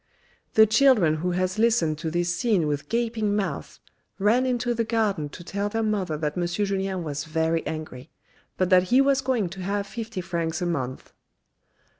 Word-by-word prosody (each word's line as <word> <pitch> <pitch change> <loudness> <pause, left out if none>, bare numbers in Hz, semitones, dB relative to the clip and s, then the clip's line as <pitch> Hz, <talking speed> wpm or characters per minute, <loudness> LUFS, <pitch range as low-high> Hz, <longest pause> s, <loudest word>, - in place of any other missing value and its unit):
" - - -38
The 220 - +8
children 220 - +4
who 175 +4 -2
has 185 +3 -1
listened 220 -10 +2
to 160 0 -3
this 175 +1 0
scene 210 -8 +1
with 145 -1 -3
gaping 225 -3 0
mouths, 205 -2 -3 0.4
ran 230 +6 +3
into 245 -1 0
the 230 0 0
garden 215 -9 0
to 175 - -10
tell 200 +3 -3
their 225 +1 -1
mother 195 -7 -1
that 150 -1 -2
M. 175 -1 0
Julien 195 -1 -1
was 150 -1 -4
very 160 +1 0
angry, 155 -3 -6 0.5
but 185 0 0
that 185 -1 +7
he 255 - +5
was 275 -1 +3
going 255 -7 0
to 190 +2 -8
have 200 +2 -2
fifty 225 0 -6
francs 170 -2 -2
a 180 - -2
month." 130 -7 -4
190 Hz, 185 wpm, -25 LUFS, 165-225 Hz, 0.5 s, The